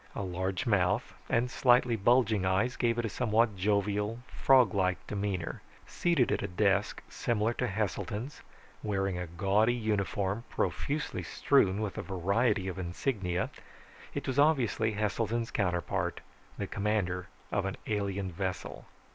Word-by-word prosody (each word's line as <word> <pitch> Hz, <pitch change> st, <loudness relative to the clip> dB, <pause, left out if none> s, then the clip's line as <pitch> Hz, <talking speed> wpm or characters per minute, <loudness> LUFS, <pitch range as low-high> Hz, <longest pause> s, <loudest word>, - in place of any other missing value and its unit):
A -, -, -3 dB
large 95 Hz, +3 st, -2 dB
mouth 100 Hz, 0 st, +1 dB, 0.2 s
and 120 Hz, +2 st, +1 dB
slightly 125 Hz, -2 st, +4 dB
bulging 110 Hz, -1 st, +3 dB
eyes 95 Hz, +7 st, +1 dB
gave 120 Hz, -1 st, +1 dB
it 120 Hz, -, 0 dB
a -, -, 0 dB
somewhat 110 Hz, -1 st, +1 dB
jovial, 105 Hz, +2 st, 0 dB
frog 130 Hz, -4 st, +4 dB
like 95 Hz, -2 st, 0 dB
demeanor. 100 Hz, -4 st, -3 dB, 0.2 s
Seated 170 Hz, -8 st, +1 dB
at -, -, +1 dB
a 100 Hz, -, -2 dB
desk 100 Hz, +1 st, +1 dB
similar 115 Hz, 0 st, 0 dB
to 125 Hz, -, -1 dB
Heselton's, 110 Hz, -, -3 dB, 0.4 s
wearing 95 Hz, -3 st, -1 dB
a 90 Hz, -, -4 dB
gaudy 100 Hz, +7 st, +2 dB
uniform 105 Hz, -2 st, -1 dB
profusely 150 Hz, +2 st, -2 dB
strewn 105 Hz, -8 st, +2 dB
with 105 Hz, -3 st, -3 dB
a -, -, -1 dB
variety 100 Hz, +3 st, +1 dB
of 95 Hz, 0 st, -4 dB
insignia, 90 Hz, 0 st, -2 dB, 0.6 s
it -, -, -3 dB
was 130 Hz, +1 st, -1 dB
obviously 125 Hz, -7 st, +3 dB
Heselton's 110 Hz, +3 st, -1 dB
counterpart, 90 Hz, -5 st, -1 dB, 0.4 s
the -, -, -2 dB
commander 95 Hz, -3 st, -1 dB, 0.2 s
of 100 Hz, -2 st, 0 dB
an 95 Hz, -, -3 dB
alien 100 Hz, -2 st, -2 dB
vessel. 95 Hz, +1 st, -4 dB
105 Hz, 140 wpm, -30 LUFS, 95-115 Hz, 0.6 s, slightly